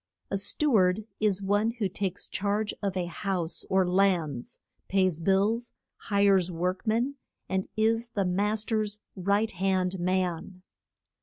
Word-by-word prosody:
A 195 - +1
stew 280 +8 +2
ard 185 +3 +2
is 200 -2 +1
one 205 +3 +1
who 225 -4 -1
takes 190 -1 -4
charge 205 +2 -1
of 195 -2 -2
a 180 - 0
house 175 -1 -2
or 190 -1 +3
lands, 180 -9 +1 0.3
pays 185 -4 +2
bills, 200 +7 +1 0.2
hires 200 -3 +2
work 180 +5 -2
men, 240 +6 +1 0.3
and 190 0 -2
is 225 +2 +2
the 200 -4 -1
mas 205 +4 0
ter's 215 -2 -1 0.2
right 200 +3 +1
hand 185 0 0
man. 180 0 -1
195 Hz, 140 wpm, -28 LUFS, 185-210 Hz, 0.3 s, or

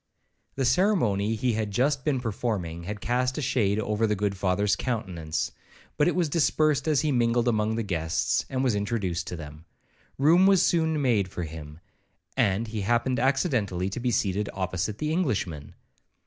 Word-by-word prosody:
The 135 - 0
ceremony 120 - +2
he 120 +2 0
had 110 -1 -1
just 130 +6 +1
been 145 -4 +1
performing, 100 -8 -3
had 105 +2 -5
cast 125 +2 0
a - - -1
shade 105 -5 +1
over 105 +1 0
the 105 - +1
good 100 0 -1
Father's 100 +2 +1
countenance, 95 -10 -3 0.4
but 150 - +2
it 175 -4 +1
dispersed 155 -3 +2
as 150 -3 +3
he 155 -1 0
mingled 120 -1 +2
among 110 -1 +1
the 115 - -1
guests, 80 -5 0
and 130 0 -1
was 125 -4 +2
introduced 100 -4 -2
to - - -4
them. 75 0 -10 0.5
Room 170 +7 +5
was 195 -3 +5
soon 160 -2 +2
made 115 -9 +2
for 90 -1 -5
him, 80 0 -9 0.5
and 100 +3 +1
he 110 -1 -3
happened 120 +4 +1
accidentally 120 - 0
to 110 - -4
be 125 +1 0
seated 100 -2 0
opposite 95 +2 -2
the 150 +4 -2
Englishman. 105 - -2
110 Hz, 170 wpm, -26 LUFS, 95-130 Hz, 0.5 s, Room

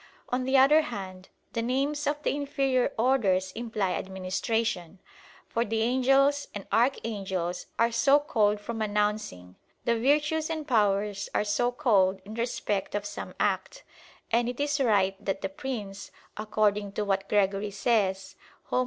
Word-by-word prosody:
On 255 +1 -1
the 265 +1 +3
other 285 +4 +6
hand, 190 -9 -7 0.2
the 230 - -1
names 275 +5 -1
of 295 0 -1
the - - 0
inferior 275 -3 0
orders 205 -7 +2
imply 220 -3 -2
administration, 190 0 -2 0.5
for 230 - 0
the 225 -1 -1
"Angels" 270 +4 +3
and 205 - -6
"Archangels" 195 -7 -1
are 235 +1 +3
so 275 +4 +5
called 210 -8 +1
from 225 +2 -5
"announcing"; 210 - -2 0.3
the 235 - +2
"Virtues" 300 +5 +2
and 315 -2 -4
"Powers" 205 -4 +1
are - - +2
so 215 +4 +1
called 200 -8 +2
in 210 - -8
respect 220 -4 -2
of 205 0 -2
some - - -7
act; - - -1 0.5
and 235 +1 +2
it 245 - -6
is 290 0 0
right 200 -4 +2
that 195 -1 -2
the - - -1
"Prince," 250 -9 -6 0.3
according 210 -1 0
to 210 - -2
what 195 -1 -1
Gregory 200 0 +1
says 200 -2 0 0.4
(Hom. - - +2
220 Hz, 150 wpm, -28 LUFS, 195-260 Hz, 0.5 s, other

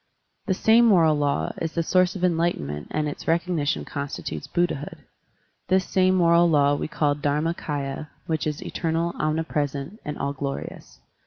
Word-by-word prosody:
This 190 -2 0
same 230 +2 +5
moral 170 -8 +5
law 145 -1 0
is 165 -1 -2
the 165 - 0
source 185 +2 +2
of 185 - -5
enlight 170 -1 +2
enment 75 0 -6
and 155 0 -1
its 145 - -6
recognition 165 -3 0
constitutes 140 0 -5
Buddha 175 +4 +1
hood. 145 +1 -7 0.7
This 185 +1 +2
same 185 0 +2
moral 170 -1 +5
law 145 -2 +4
we 145 - -2
call 150 -2 +1
Dharmakdya, 145 -1 -2 0.2
which 160 -1 -1
is 150 -1 -3
eternal, 165 0 -1
omnipresent, 155 +2 -2
and 150 -1 -5
all 140 0 -2
glorious. 140 0 -6
160 Hz, 160 wpm, -24 LUFS, 145-175 Hz, 0.7 s, same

